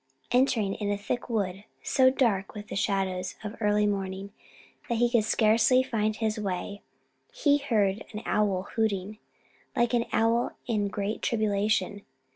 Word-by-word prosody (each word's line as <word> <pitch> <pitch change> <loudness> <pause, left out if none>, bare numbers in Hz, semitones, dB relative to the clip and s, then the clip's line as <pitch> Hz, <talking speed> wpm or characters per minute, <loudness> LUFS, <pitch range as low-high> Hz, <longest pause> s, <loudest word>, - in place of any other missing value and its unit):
Entering 240 -5 +2
in 205 -1 -3
a 205 - 0
thick 220 +5 -4
wood, 200 -4 -2 0.2
so 260 -2 +4
dark 225 -8 0
with 210 0 -8
the - - -5
shadows 190 -2 -1
of 210 0 -5
early 210 0 +3
morning 195 -1 -3 0.6
that 235 - +1
he 240 +1 +4
could 230 -3 +3
scarcely 225 +4 +4
find 215 -4 -1
his 220 0 -1
way, 200 0 -4 0.5
he 290 -12 +2
heard 210 -7 +1
an 215 0 -6
owl 200 -3 +1
hooting, 210 -2 -1 0.6
like 240 0 +2
an 235 -1 +2
owl 230 +2 +2
in 210 -4 0
great 205 +1 -3
tribulation. 215 -2 0
210 Hz, 150 wpm, -28 LUFS, 200-230 Hz, 0.6 s, so